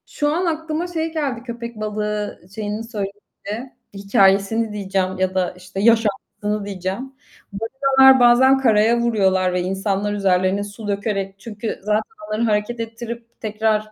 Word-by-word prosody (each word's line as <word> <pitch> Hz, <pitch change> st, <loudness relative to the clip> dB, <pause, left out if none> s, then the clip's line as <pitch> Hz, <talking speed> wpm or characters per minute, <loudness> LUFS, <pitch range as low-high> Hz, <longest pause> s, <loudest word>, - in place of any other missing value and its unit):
Şu 295 Hz, -, -1 dB
an 355 Hz, +3 st, 0 dB
aklıma 320 Hz, +1 st, -2 dB
şey 325 Hz, -2 st, -3 dB
geldi, 275 Hz, -7 st, -2 dB
köpek 235 Hz, -1 st, -6 dB
balığı 210 Hz, -1 st, -3 dB
şeyini 215 Hz, 0 st, -3 dB
söyleyince, 210 Hz, +2 st, -7 dB, 0.2 s
hikâyesini 200 Hz, +2 st, +2 dB
diyeceğim 190 Hz, -2 st, -1 dB
ya 185 Hz, 0 st, 0 dB
da, 185 Hz, -1 st, 0 dB
işte, 185 Hz, +1 st, -8 dB
yaşantısını 210 Hz, -1 st, +1 dB
diyeceğim. 195 Hz, +6 st, -4 dB, 0.4 s
Balinalar 265 Hz, +4 st, +5 dB
bazen 250 Hz, +2 st, +6 dB
karaya 230 Hz, -2 st, +4 dB
vuruyorlar 190 Hz, -6 st, +2 dB
ve 180 Hz, -, 0 dB
insanlar 195 Hz, +2 st, -1 dB
üzerlerine 190 Hz, 0 st, +1 dB
su 205 Hz, +1 st, -8 dB
dökerek 200 Hz, -1 st, -2 dB
Çünkü 215 Hz, +1 st, -5 dB
zaten 210 Hz, +1 st, +2 dB, 0.3 s
onları 215 Hz, +1 st, -2 dB
hareket 215 Hz, +1 st, 0 dB
ettirip 230 Hz, +1 st, -7 dB
tekrar, 215 Hz, 0 st, 0 dB
215 Hz, 135 wpm, -21 LUFS, 200-235 Hz, 0.4 s, bazen